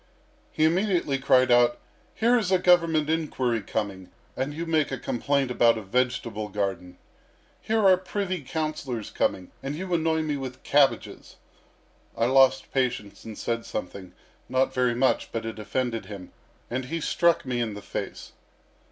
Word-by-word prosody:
He 155 - +2
immediately 170 -5 +1
cried 130 -1 +4
out: 120 0 +5 0.4
'Here 235 +2 +3
is 210 -6 +1
a 185 - +5
Government 170 -4 +3
inquiry 135 -8 0
coming, 100 -4 -4 0.3
and 135 +2 -2
you 165 +3 -5
make 160 -2 +1
a 135 - -2
complaint 135 +2 -1
about 115 -2 +4
a 110 - -6
vegetable 115 -1 -1
garden. 95 -3 -3 0.6
Here 220 -1 +1
are 185 -1 +6
privy 185 -1 -3
councillors 140 -6 -4
coming, 90 -1 -1
and 140 +2 -4
you 180 +2 -4
annoy 160 -1 +1
me 150 -2 -2
with 130 -1 -7
cabbages!' 140 -1 +1 0.8
I 115 - +2
lost 135 +1 +4
patience 125 -6 -2
and 110 -2 -8
said 115 0 -2
something 95 -1 -6 0.4
not 130 +1 +1
very 125 -2 +1
much, 130 +2 +1
but 115 -1 -4
it 110 -1 -6
offended 120 +1 -2
him, 100 -4 -9 0.4
and 125 +2 -3
he 165 +5 -3
struck 170 +1 +2
me 125 -2 -1
in 110 -3 -2
the 105 - -8
face. - - -6
130 Hz, 160 wpm, -26 LUFS, 115-160 Hz, 0.8 s, are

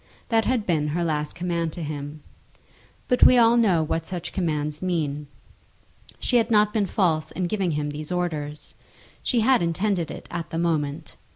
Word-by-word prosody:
That 225 -2 +2
had 245 -4 0
been 155 -4 +1
her 170 +4 -1
last 150 -2 -2
command 170 -2 -1
to 170 - -5
him. 145 0 -6 0.8
But 250 - +1
we 250 - +8
all 235 0 +6
know 195 -9 +3
what 160 +1 -2
such 175 -2 -5
commands 150 -4 -2
mean. 150 -5 -2 0.9
She 245 - +2
had 230 0 +2
not 210 -2 +4
been 210 -3 +1
false 165 -6 +1
in 185 - -3
giving 190 0 0
him 150 -2 -2
these 150 +3 -7
orders. 155 -4 -3 0.5
She 240 - +1
had 255 +1 +4
intended 170 0 0
it - - -8
at 170 -2 -4
the 165 - -4
moment. 155 -4 -1
170 Hz, 175 wpm, -24 LUFS, 150-200 Hz, 0.9 s, we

